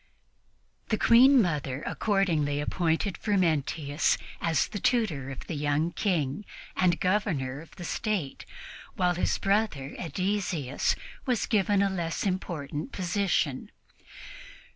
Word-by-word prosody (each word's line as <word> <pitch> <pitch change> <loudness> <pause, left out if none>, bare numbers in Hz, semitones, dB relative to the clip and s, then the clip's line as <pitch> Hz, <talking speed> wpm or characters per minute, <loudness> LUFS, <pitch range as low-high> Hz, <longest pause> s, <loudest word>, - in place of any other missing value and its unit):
The 215 - +2
Queen 255 +5 +7
Mother 145 -5 -2
accordingly 165 -9 +1
appointed 170 +4 0
Frumentius 160 -6 +1 0.2
as 165 -2 +2
the 205 - -4
tutor 180 - +1
of 135 - -7
the - - -5
young 150 +2 0
King, 165 -5 -1 0.3
and 175 -2 +2
Governor 160 -9 0
of 165 - -15
the 180 - -8
State, 185 -5 -2 0.5
while 180 -1 +2
his 175 - 0
brother 195 -9 0
Ædesius 180 -6 -1 0.3
was 245 -4 +1
given 205 -2 +2
a 200 - +2
less 170 -2 -2
important 170 - -3
position. 180 -3 0
175 Hz, 115 wpm, -28 LUFS, 145-200 Hz, 0.5 s, Queen